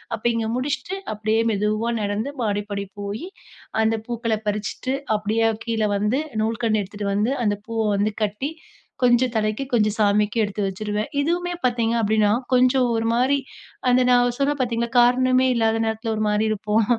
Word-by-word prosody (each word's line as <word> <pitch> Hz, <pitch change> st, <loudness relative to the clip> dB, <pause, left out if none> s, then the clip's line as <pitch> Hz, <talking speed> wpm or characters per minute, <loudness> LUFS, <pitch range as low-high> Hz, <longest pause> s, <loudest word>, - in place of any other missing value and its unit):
அப்ப 220 Hz, -, -13 dB
இங்க 225 Hz, -1 st, -1 dB
முடிச்சுட்டு, 290 Hz, +8 st, -2 dB, 0.2 s
அப்பிடியே 215 Hz, +1 st, 0 dB
மெதுவா 215 Hz, +3 st, 0 dB
நடந்து, 205 Hz, +5 st, -2 dB
மாடிப்படி 205 Hz, -1 st, -2 dB, 0.2 s
போயி, 205 Hz, -, -5 dB, 0.6 s
அந்த 220 Hz, +1 st, +2 dB
பூக்கள 230 Hz, -2 st, -1 dB
பறிச்சுட்டு, 210 Hz, +5 st, -2 dB, 0.2 s
அப்பிடியே 215 Hz, +2 st, +1 dB, 0.2 s
கீழ 225 Hz, -2 st, -1 dB, 0.2 s
வந்து, 210 Hz, +6 st, +1 dB, 0.2 s
நூல்கண்டு 225 Hz, -1 st, 0 dB
எடுத்துட்டு 205 Hz, +1 st, -6 dB
வந்து, 215 Hz, +6 st, +1 dB
அந்த 205 Hz, -1 st, +1 dB
பூவ 230 Hz, -1 st, -3 dB, 0.2 s
வந்து 205 Hz, +1 st, 0 dB
கட்டி, 210 Hz, +8 st, -2 dB, 0.5 s
கொஞ்சம் 245 Hz, 0 st, +4 dB
தலைக்கு, 215 Hz, +3 st, 0 dB
கொஞ்சம் 215 Hz, -3 st, +2 dB
சாமிக்கு 210 Hz, +1 st, +2 dB
எடுத்து 205 Hz, 0 st, -3 dB
வச்சுருவேன். 210 Hz, +2 st, -3 dB
இதுவுமே 350 Hz, +4 st, -1 dB
பாத்தீங்க 235 Hz, -2 st, +1 dB
அப்பிடீன்னா 215 Hz, -1 st, +2 dB, 0.2 s
கொஞ்சம் 255 Hz, +1 st, +4 dB
ஒரு 225 Hz, 0 st, -1 dB
மாரி 260 Hz, +4 st, +3 dB, 0.5 s
அந்த 250 Hz, +1 st, +4 dB
நான் 245 Hz, -1 st, +3 dB
சொன்னேன் 285 Hz, +1 st, +1 dB
பாத்தீங்களா, 235 Hz, -1 st, -1 dB
காரணமே 255 Hz, +1 st, +4 dB
இல்லாத 225 Hz, -1 st, +2 dB
நேரத்துல 220 Hz, +1 st, -2 dB
ஒரு -, -, -2 dB
மாரி 210 Hz, +1 st, +1 dB
இருப்போம். 215 Hz, +1 st, +1 dB
225 Hz, 150 wpm, -23 LUFS, 210-245 Hz, 0.6 s, கொஞ்சம்